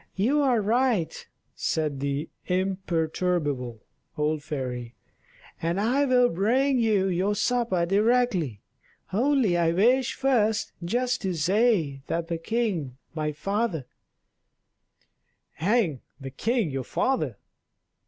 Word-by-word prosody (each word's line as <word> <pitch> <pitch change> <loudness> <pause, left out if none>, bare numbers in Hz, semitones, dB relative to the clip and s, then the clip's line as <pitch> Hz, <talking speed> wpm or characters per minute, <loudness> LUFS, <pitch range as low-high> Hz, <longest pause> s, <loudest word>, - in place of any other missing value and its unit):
"You 255 +10 +2
are 250 -5 +3
right," 230 -5 0 0.3
said 150 -4 -1
the 140 +3 -2 0.2
imperturbable 170 - -1 0.4
old 150 0 0
fairy; 125 -5 -5 0.7
"and 170 +3 0
I 255 +7 +2
will 250 -2 +4
bring 250 +9 +2
you 215 -4 +2
your 190 +3 0
supper 230 -7 +1
directly, 195 - +1 0.5
only 245 -3 +2
I 165 -1 +3
wish 245 +7 +3
first 220 -5 +1
just 245 +8 0
to 190 -3 -1
say 170 - +2
that 165 0 -2
the 165 -1 -2
king 175 - -2 0.2
my 155 -1 -2
father 195 - -2 0.9
" - - -46
"Hang 200 - +2 0.2
the 135 -1 -7
king 220 - 0
your 135 -1 -3
father!" 155 - -1
190 Hz, 115 wpm, -26 LUFS, 155-235 Hz, 0.9 s, will